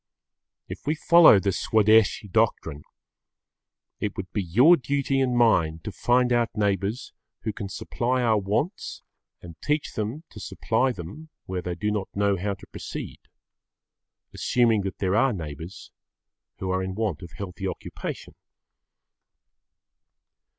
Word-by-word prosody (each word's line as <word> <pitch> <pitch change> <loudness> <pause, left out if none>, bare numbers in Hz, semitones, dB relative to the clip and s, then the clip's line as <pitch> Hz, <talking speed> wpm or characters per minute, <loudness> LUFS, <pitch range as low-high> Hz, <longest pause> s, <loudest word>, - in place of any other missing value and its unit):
If - - -9
we 155 - +2
follow 170 -6 +7
the 100 0 0
Swadeshi 110 +2 +3
doctrine, 90 -9 0 1.2
it 105 - -3
would 95 -2 -6
be 105 - 0
your 120 - +6
duty 135 0 0
and 125 -2 +1
mine 85 -10 +3
to 105 - -5
find 125 +3 +2
out 120 -1 +2
neighbours 100 +3 -1 0.3
who 110 - -3
can 100 -2 -6
supply 125 +6 -1
our 110 -3 +3
wants 110 - -3 0.4
and 85 -2 -12
to - - -12
teach 150 0 0
them 110 +9 -4
to - - -10
supply 130 +4 0
them 110 - -9 0.2
where 90 -1 -3
they 90 0 -4
do 105 +2 -1
not 105 -2 -2
know 100 0 +2
how 100 +2 -2
to - - -15
proceed, - - -7 1.1
assuming 115 -4 +2
that 95 -1 -5
there 95 0 0
are 125 +3 +3
neighbours 80 +1 -8 0.7
who 95 -1 -3
are 95 0 0
in 95 0 -4
want 105 -7 -2
of 85 -4 -10
healthy 95 0 -6
occupation. - - -6
105 Hz, 145 wpm, -25 LUFS, 95-120 Hz, 1.2 s, follow